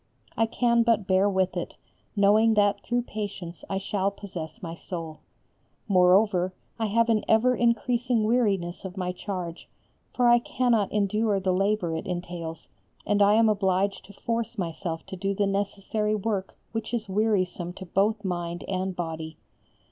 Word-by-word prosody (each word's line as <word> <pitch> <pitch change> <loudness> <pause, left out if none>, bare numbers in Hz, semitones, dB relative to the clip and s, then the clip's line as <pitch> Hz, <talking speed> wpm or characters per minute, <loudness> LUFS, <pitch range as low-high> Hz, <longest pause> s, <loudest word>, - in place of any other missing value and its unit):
I 225 - +2
can 235 +1 +2
but 230 -3 +2
bear 190 +1 +3
with 190 -1 0
it, - - -4 0.4
knowing 215 +2 +4
that 205 -1 +3
through 240 +2 -1
patience 200 -7 -6
I 195 - -1
shall 195 0 0
possess 180 -6 -8
my 165 -1 -4
soul. 165 -2 -7 0.7
Moreover, 185 -1 +4 0.2
I 220 - +1
have 230 +3 +2
an 215 -2 +2
ever 245 +3 +4
increasing 240 0 +1
weariness 205 -7 +1
of 190 0 -7
my 180 -1 -1
charge, 180 -2 -6 0.4
for 245 -1 +2
I 240 0 +7
cannot 235 -4 +1
endure 210 0 +1
the 190 -1 0
labour 195 -3 +1
it 160 - -5
entails, 175 -2 -5 0.4
and 205 0 +2
I 205 +1 +6
am 225 0 +5
obliged 195 -1 +1
to 200 - -14
force 230 +2 -3
myself 165 -2 -4
to - - -7
do 195 +2 -2
the 205 - +2
necessary 200 +2 -1
work 205 -2 -3
which 225 +1 -3
is 225 -2 -3
wearisome 190 -4 0
to 190 - -9
both 205 +4 +1
mind 175 -1 -3
and 185 -1 -2
body. 160 -2 -5
200 Hz, 160 wpm, -26 LUFS, 180-220 Hz, 0.7 s, I